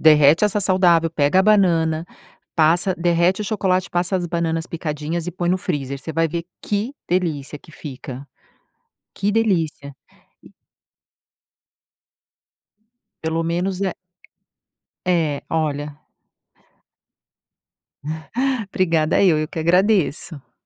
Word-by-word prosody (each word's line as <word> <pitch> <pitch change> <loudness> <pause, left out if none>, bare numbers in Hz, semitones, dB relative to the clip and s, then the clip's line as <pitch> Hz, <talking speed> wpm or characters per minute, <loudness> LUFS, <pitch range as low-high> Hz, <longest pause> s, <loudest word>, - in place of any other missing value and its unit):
derrete 155 +3 +6
essa 210 0 0
saudável, 180 -4 +3
pega 150 +3 +3
a - - +4
banana, 170 -6 +3 0.5
passa, 170 +4 +3
derrete 175 +2 +2
o 210 - -3
chocolate, 190 -3 0
passa 180 +2 0
as 175 -1 -3
bananas 165 -1 -1
picadinhas 160 0 -4
e 180 - -3
põe 175 0 -3
no 185 - +2
freezer. 140 -7 -3
Você 160 - -6
vai 165 +1 +1
ver 170 +1 -4 0.2
que 210 +6 -2 0.2
delícia 155 -6 -1
que 155 - -18
fica. 135 -2 -8 0.9
Que 200 +1 0
delícia. 165 -10 0 0.5
E. - - -17 2.7
Pelo 160 +1 -1
menos 180 +3 -1
é 190 -3 -1 1.1
é, 165 -6 +1
olha. 150 -2 -2 2.7
Obrigada 165 -2 +2
eu, 170 -5 +4
eu 155 - -1
que 160 - -8
agradeço. 170 - +1
165 Hz, 110 wpm, -21 LUFS, 155-185 Hz, 2.7 s, derrete